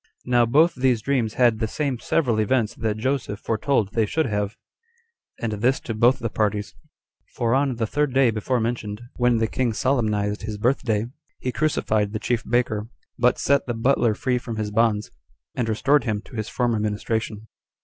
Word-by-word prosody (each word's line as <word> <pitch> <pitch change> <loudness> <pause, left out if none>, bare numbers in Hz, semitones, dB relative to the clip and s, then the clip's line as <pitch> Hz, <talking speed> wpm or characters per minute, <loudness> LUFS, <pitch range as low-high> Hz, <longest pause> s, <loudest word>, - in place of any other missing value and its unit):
Now 120 -1 +3
both 155 +7 +4
these 125 -4 +1
dreams 120 -5 0
had 120 -3 +3
the 110 - 0
same 140 0 -2
several 120 -8 +1
events 110 +1 +1
that 110 -2 -2
Joseph 120 -3 -2
foretold 115 -1 0
they 110 -2 +1
should 160 +8 0
have, 105 -1 -2 0.8
and 115 - -2
this 120 +6 +1
to 115 - -4
both 120 +4 +4
the 115 -3 -3
parties; 105 -1 -1 0.6
for 115 -1 +1
on 135 -1 +2
the 115 -1 -1
third 145 +5 0
day 130 -2 +4
before 115 +4 -1
mentioned, 110 -3 -3 0.2
when 120 -1 +3
the 115 - +2
king 120 +1 -1
solemnized 105 -5 0
his 105 0 -5
birth 125 +6 +1
day, 110 -3 0 0.3
he 125 - -3
crucified 110 -8 0
the 110 - -2
chief 115 0 -1
baker, 110 -3 0 0.3
but 125 +1 +3
set 140 -1 +1
the 120 - -2
butler 120 -1 +2
free 125 +2 0
from 115 -2 -6
his 105 -1 -3
bonds, 110 -1 +1 0.4
and 120 -2 -2
restored 140 +7 +3
him 105 -2 -2
to 125 - -13
his 110 -2 -3
former 120 -3 0
ministration. 110 +1 -2
115 Hz, 185 wpm, -23 LUFS, 110-125 Hz, 0.8 s, both